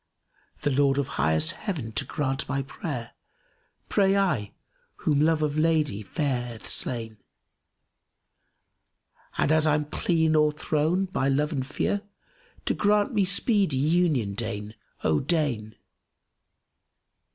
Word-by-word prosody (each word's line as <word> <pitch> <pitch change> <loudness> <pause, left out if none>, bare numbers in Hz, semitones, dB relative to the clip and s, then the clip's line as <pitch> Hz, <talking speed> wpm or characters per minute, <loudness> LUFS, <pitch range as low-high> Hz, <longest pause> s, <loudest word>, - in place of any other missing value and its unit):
The 145 - +2
Lord 135 0 +3
of 140 -2 0
highmost 80 +2 +1
Heaven 145 - -4
to 110 - -1
grant 135 -2 -2
my 135 0 0
prayer 135 -3 -5 0.4
* - - -42
Pray 195 -1 +3
I, 140 - +1 0.4
whom 145 -2 +1
love 155 0 +3
of 150 0 0
lady 155 -9 +2
fair 135 - -1
hath 115 -2 -9
slain; 115 -4 -3 2.2
And - - +2
as 155 0 +3
I'm 150 0 +2
clean 160 +1 +1
o'erthrown 155 +4 +2
by 135 -6 +1
love 150 +3 +1
and 135 -4 -1
fear, 150 +8 -1 0.3
* - - -31
To - - +2
grant 210 +4 +2
me 205 -3 +3
speedy 195 - +2
union 150 - +2
deign, 105 -1 -4 0.3
oh 80 -1 +3
deign!" 135 -9 -1
145 Hz, 130 wpm, -26 LUFS, 120-160 Hz, 2.2 s, Lord